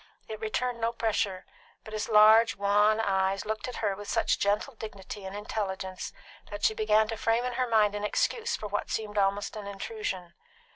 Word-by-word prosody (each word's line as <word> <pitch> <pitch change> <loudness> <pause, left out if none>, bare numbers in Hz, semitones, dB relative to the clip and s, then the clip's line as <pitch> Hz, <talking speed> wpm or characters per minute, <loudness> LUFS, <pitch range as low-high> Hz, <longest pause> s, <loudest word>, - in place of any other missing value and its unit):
It 215 -1 -6
returned 235 +2 -2
no 230 +1 +1
pressure, 215 -5 -1 0.4
but 215 - -10
his 215 +1 -3
large, 220 +1 +7
wan 205 +2 +3
eyes 195 -2 +1
looked 215 +1 -3
at 250 - -6
her 200 -2 +1
with 205 +1 -9
such - - +1
gentle 205 +7 0
dignity 205 -3 -8
and 190 +1 -6
intelligence 190 -3 -4 0.4
that 205 0 -7
she - - +4
began 215 0 +3
to 225 - -3
frame 230 +2 +1
in 250 - -2
her 255 +1 0
mind 215 -3 +3
an 205 0 -4
excuse 460 - 0
for - - -7
what 205 0 -3
seemed 210 -1 -2
almost 200 +2 0
an 210 -2 -6
intrusion. 195 - -5
210 Hz, 190 wpm, -29 LUFS, 200-225 Hz, 0.4 s, large